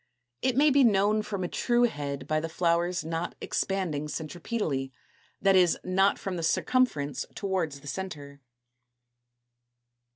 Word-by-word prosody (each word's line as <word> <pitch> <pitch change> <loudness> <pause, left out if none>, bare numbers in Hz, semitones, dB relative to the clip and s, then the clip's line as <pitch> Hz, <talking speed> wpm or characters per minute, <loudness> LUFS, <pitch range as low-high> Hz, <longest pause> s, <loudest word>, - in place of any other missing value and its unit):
It 260 -1 +1
may 295 +1 +5
be 275 0 +5
known 210 -1 +3
from 200 -3 -4
a - - -1
true 240 +6 +1
head 140 - -2
by 155 +2 +1
the 165 +1 -4
flowers 170 +1 0
not 165 +1 -3
expanding 170 -7 -2
centripetally, 155 - -3 0.5
that 195 -1 +4
is, 180 -2 +4
not 195 +2 +2
from 190 -2 -4
the - - -3
circumference 160 - +1
towards 185 -8 -2
the 145 - -12
centre. 145 -5 -6
180 Hz, 135 wpm, -28 LUFS, 150-200 Hz, 0.5 s, may